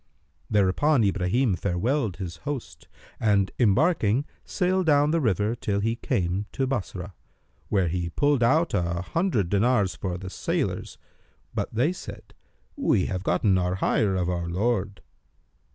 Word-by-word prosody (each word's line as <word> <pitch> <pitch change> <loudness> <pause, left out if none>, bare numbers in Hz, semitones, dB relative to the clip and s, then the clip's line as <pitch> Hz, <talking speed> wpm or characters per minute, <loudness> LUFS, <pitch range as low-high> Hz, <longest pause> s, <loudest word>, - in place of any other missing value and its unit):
Thereupon 110 +7 +3
Ibrahim 100 +4 +1
farewelled 100 - -1
his 90 -3 -6
host 120 - -6 0.3
and 100 -3 +2
embarking, 125 - +3 0.2
sailed 185 -1 0
down 145 0 +4
the 165 0 +1
river 105 - +1
till 100 -3 -2
he 115 +3 0
came 95 -1 -1
to 135 - 0
Bassorah, 100 -7 -4 0.6
where 95 -4 +2
he 85 0 -2
pulled 145 +7 +1
out 160 +8 +3
an 85 0 -1
hundred 125 - 0
dinars 100 -1 +2
for 90 -2 -4
the 95 0 -8
sailors, - - -2 0.6
but - - -2
they 130 +10 +1
said, - - -10 0.4
"We 95 - +2
have 95 -3 -3
gotten 95 -1 +2
our 90 0 0
hire 95 +1 +1
of 90 -2 0
our 85 -1 -2
lord." 100 +1 -1
100 Hz, 140 wpm, -26 LUFS, 90-130 Hz, 0.6 s, down